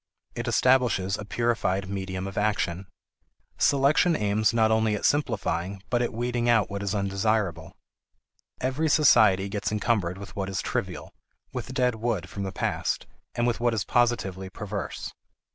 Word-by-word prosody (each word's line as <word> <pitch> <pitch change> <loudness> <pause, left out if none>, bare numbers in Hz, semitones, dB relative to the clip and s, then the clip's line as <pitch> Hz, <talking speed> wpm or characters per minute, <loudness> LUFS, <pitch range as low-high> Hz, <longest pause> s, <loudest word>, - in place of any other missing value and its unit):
It - - -5
establishes 120 -7 +3
a 105 - -7
purified 100 -4 0
medium 95 -1 -4
of 100 -1 -6
action. 100 -3 -1 0.7
Selection 145 +5 +4
aims 105 -2 +2
not 110 -1 +3
only 110 -1 +2
at 105 - -3
simplifying 100 - 0
but 120 -1 +2
at 120 - 0
weeding 120 +1 -1
out 115 -4 +3
what 100 0 -3
is 100 +1 -2
undesirable. 100 -4 -1 0.8
Every 130 +5 0
society 105 -10 +5
gets 100 +1 -3
encumbered 105 -4 0
with 100 0 -10
what 95 -1 -3
is 95 - -2
trivial, - - -4 0.4
with 125 0 -5
dead 125 -2 +2
wood 110 -4 -2
from 100 - -6
the 95 -1 -3
past, - - -2 0.3
and 120 - +1
with 120 -1 0
what 120 -1 +1
is 105 - 0
positively 100 -6 0
perverse. 100 0 -5
105 Hz, 155 wpm, -26 LUFS, 95-120 Hz, 0.8 s, society